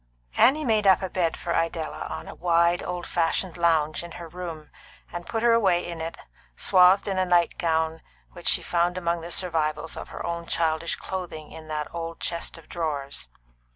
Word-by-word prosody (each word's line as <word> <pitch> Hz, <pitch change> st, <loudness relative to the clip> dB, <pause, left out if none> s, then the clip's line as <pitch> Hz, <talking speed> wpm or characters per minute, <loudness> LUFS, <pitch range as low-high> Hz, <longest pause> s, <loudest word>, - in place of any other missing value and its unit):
Annie 295 Hz, +5 st, +5 dB
made 215 Hz, -3 st, +3 dB
up 190 Hz, 0 st, +6 dB
a 190 Hz, -, -3 dB
bed 170 Hz, -3 st, 0 dB
for 170 Hz, -, -3 dB
Idella 165 Hz, -1 st, -1 dB
on -, -, -6 dB
a -, -, -7 dB
wide, 170 Hz, 0 st, +3 dB
old 175 Hz, -1 st, -4 dB
fashioned 170 Hz, +1 st, 0 dB
lounge 165 Hz, -3 st, +2 dB
in 170 Hz, -1 st, -9 dB
her 170 Hz, -, -8 dB
room, 165 Hz, -3 st, -7 dB, 0.4 s
and 175 Hz, 0 st, -6 dB
put 225 Hz, 0 st, -2 dB
her 235 Hz, -1 st, +6 dB
away 190 Hz, -7 st, +3 dB
in 170 Hz, -2 st, -5 dB
it, 165 Hz, +1 st, -4 dB, 0.4 s
swathed 185 Hz, +2 st, +5 dB
in 190 Hz, -2 st, 0 dB
a -, -, +4 dB
night 175 Hz, -1 st, +2 dB
gown 160 Hz, -1 st, 0 dB, 0.3 s
which -, -, -8 dB
she -, -, +4 dB
found 175 Hz, +1 st, +1 dB
among 170 Hz, -1 st, 0 dB
the 170 Hz, -, -7 dB
survivals 160 Hz, -3 st, -1 dB
of -, -, -7 dB
her -, -, -6 dB
own 170 Hz, 0 st, -3 dB
childish 165 Hz, 0 st, 0 dB
clothing 175 Hz, -5 st, -6 dB
in 160 Hz, -1 st, -10 dB
that 150 Hz, -1 st, -4 dB
old 165 Hz, 0 st, -5 dB
chest 170 Hz, 0 st, -3 dB
of 165 Hz, -, -15 dB
drawers. 140 Hz, -, -3 dB
170 Hz, 190 wpm, -26 LUFS, 160-180 Hz, 0.4 s, up